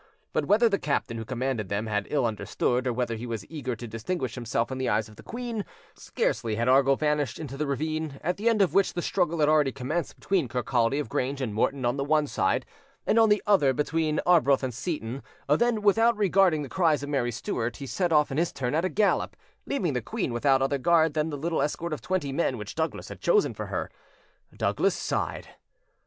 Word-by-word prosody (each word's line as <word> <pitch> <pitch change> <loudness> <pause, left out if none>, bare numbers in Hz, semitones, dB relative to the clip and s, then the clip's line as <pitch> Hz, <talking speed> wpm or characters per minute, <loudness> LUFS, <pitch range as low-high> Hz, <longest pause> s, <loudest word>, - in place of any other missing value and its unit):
But - - 0
whether 225 +3 +4
the 200 -3 +1
captain 125 -5 -1
who 115 - -5
commanded 125 -4 -2
them 100 +2 -1
had 105 -2 -2
ill 140 -4 +1
understood, 120 +3 -1
or - - +2
whether 120 -1 -1
he 115 +2 -6
was 115 -4 -4
eager 130 -6 -3
to 120 +1 -8
distinguish 115 +4 -3
himself 120 0 -2
in 130 - -4
the 130 - 0
eyes 110 +1 +1
of 105 - -15
the - - -13
queen, 235 -3 -4 0.3
scarcely 110 -2 -2
had 115 +2 -1
Argyll 135 +1 +5
vanished 150 -3 0
into 140 -4 -6
the 150 +1 -2
ravine, 155 +1 -2
at 180 +3 -1
the 220 +3 +2
end 215 -3 +4
of 175 - 0
which 195 0 +3
the 175 - -3
struggle 170 -3 0
had 150 - +4
already 150 -3 +4
commenced 145 +7 -3
between 185 -8 0
Kirkcaldy 120 +1 0
of 150 - -2
Grange 135 +5 -2
and 125 -6 -2
Morton 130 +4 0
on 120 +3 +1
the 140 - 0
one 150 +1 +2
side, 95 -9 0 0.4
and 230 - +3
on 225 -1 +5
the 210 0 +3
other 170 -10 +4
between 155 +2 0
Arbroath 150 -7 +4
and 130 -2 -2
Seyton, 135 -2 -4 0.3
than, 215 +9 +2
without 225 +3 +4
regarding 190 -6 +3
the - - -6
cries 160 -3 +1
of 145 - -5
Mary 130 -4 0
Stuart, 115 +1 -3
he 140 - -7
set 170 +8 -1
off 150 -2 +3
in 135 - 0
his 170 - +1
turn 125 -2 -3
at 160 +3 +1
a 185 - +1
gallop, 205 +4 +1 0.3
leaving 180 - -1
the 125 - -1
queen 115 - -3
without 135 +2 +3
other 135 +1 0
guard 160 +1 +3
than 155 0 0
the 145 - -4
little 165 +2 -1
escort 155 +3 -2
of 155 - -5
twenty 185 -7 -1
men 135 -3 0
which 105 -1 -7
Douglas 160 0 -3
had - - -10
chosen 440 -4 +3
for - - -6
her. - - -3 0.7
Douglas - - +1
sighed. - - -3
145 Hz, 225 wpm, -27 LUFS, 125-170 Hz, 0.7 s, Argyll